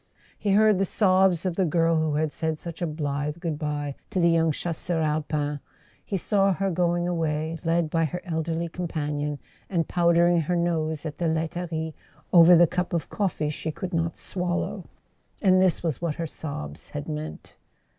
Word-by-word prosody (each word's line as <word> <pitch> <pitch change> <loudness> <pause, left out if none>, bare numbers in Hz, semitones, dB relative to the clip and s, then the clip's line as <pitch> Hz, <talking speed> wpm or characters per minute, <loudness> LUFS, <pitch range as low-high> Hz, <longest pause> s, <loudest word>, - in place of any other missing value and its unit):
He 200 -2 0
heard 215 -1 +5
the - - +3
sobs 190 -3 +3
of 180 -2 0
the 190 - +3
girl 165 +1 +2
who 155 -2 0
had 155 0 0
said 160 -1 -2
such 170 +2 -8
a 175 - 0
blithe 150 0 -2
goodbye 150 -3 -3 0.2
to 195 - -1
the 170 -1 +4
young 165 -1 +3
Chasseur 170 +2 -2
Alpin, 150 -1 -1 0.4
he 195 - -2
saw 195 +1 +2
her 195 +2 -1
going 175 0 +1
away, 160 -1 -1
led 165 -1 +1
by 165 -1 +2
her 180 +4 -3
elderly 165 0 -2
companion, 150 -4 -3 0.3
and 170 -4 0
powdering 170 0 +3
her 175 +3 -1
nose 160 -3 -1
at 150 -2 -5
the 170 - +1
laiterie 160 0 -2 0.4
over 175 0 +9
the 175 +1 +7
cup 180 +2 -2
of 170 -3 -2
coffee 175 -7 -1
she 160 - -4
could 180 +4 -6
not 165 0 -1
swallow. 180 -1 -2 0.5
And 185 -2 +4
this 185 -2 +2
was 160 -5 -2
what 165 -3 -1
her 170 - -3
sobs 75 - -7
had 145 0 -6
meant. 155 0 -6
165 Hz, 175 wpm, -26 LUFS, 155-175 Hz, 0.5 s, over